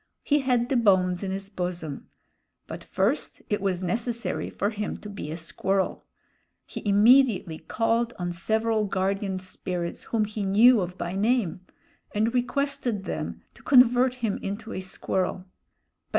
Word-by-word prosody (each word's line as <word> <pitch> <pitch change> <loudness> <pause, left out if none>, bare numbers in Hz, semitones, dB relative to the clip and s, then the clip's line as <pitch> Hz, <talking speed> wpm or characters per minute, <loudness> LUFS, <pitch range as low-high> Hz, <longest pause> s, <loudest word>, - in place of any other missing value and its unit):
He 295 0 +3
had 250 -3 +1
the 270 - +1
bones 185 -5 +3
in 195 - -3
his 195 +1 -4
bosom; 175 -6 -4 0.6
but - - -8
first - - -1
it 205 - +1
was 190 -2 -1
necessary 235 +6 -2
for 205 +2 -1
him 210 -1 -4
to 210 - -10
be 195 -6 -6
a 160 - -4
squirrel. 190 +4 -1 0.6
He - - -7
immediately 210 -5 +4
called 230 +1 0
on 175 -1 -2
several 220 +5 0
guardian 195 0 -1
spirits 180 -2 -5
whom 220 -2 0
he 215 0 -5
knew 215 +4 +6
of 180 0 -4
by 175 +1 -4
name, 205 -3 +1 0.5
and 220 +3 +1
requested 255 -4 -1
them - - -5
to - - -18
convert 250 -1 +5
him 230 -5 -2
into 220 +3 -5
a - - -3
squirrel. 185 0 -2
205 Hz, 150 wpm, -26 LUFS, 185-235 Hz, 0.6 s, knew